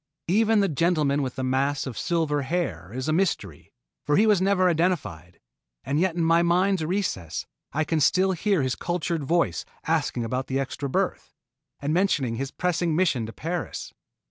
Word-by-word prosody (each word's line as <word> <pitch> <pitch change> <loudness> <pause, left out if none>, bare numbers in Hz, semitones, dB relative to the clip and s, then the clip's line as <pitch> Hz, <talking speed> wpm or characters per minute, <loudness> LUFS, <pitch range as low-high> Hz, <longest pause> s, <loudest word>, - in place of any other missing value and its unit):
Even 220 +2 +4
the 200 - +3
gentleman 150 -3 +1
with 130 -2 -3
the 130 - -3
mass 135 +2 0
of 130 -4 -5
silver 160 - 0
hair 130 - -3
is 130 +3 -4
a 155 - +2
mystery, 155 - -1 0.3
for 145 - +2
he 215 - +5
was 210 -4 +4
never 190 -1 +3
identified, 155 - -1 0.4
and 140 +4 0
yet 180 -1 +1
in 170 - 0
my 165 +1 +4
mind's 180 +1 +2
recesses 155 - -2 0.3
I 155 - 0
can 160 +1 0
still 185 +6 +3
hear 185 -2 +1
his 130 -1 0
cultured 175 -2 -2
voice 140 - +1 0.2
asking 120 - 0
about 130 +3 -2
the 135 0 -1
extra 135 +1 -3
berth, - - -2 0.4
and 145 +2 -1
mentioning 150 -11 +1
his 135 +2 -3
pressing 175 0 0
mission 150 -10 +1
to - - -7
Paris. 170 +1 -4
160 Hz, 175 wpm, -25 LUFS, 130-180 Hz, 0.4 s, he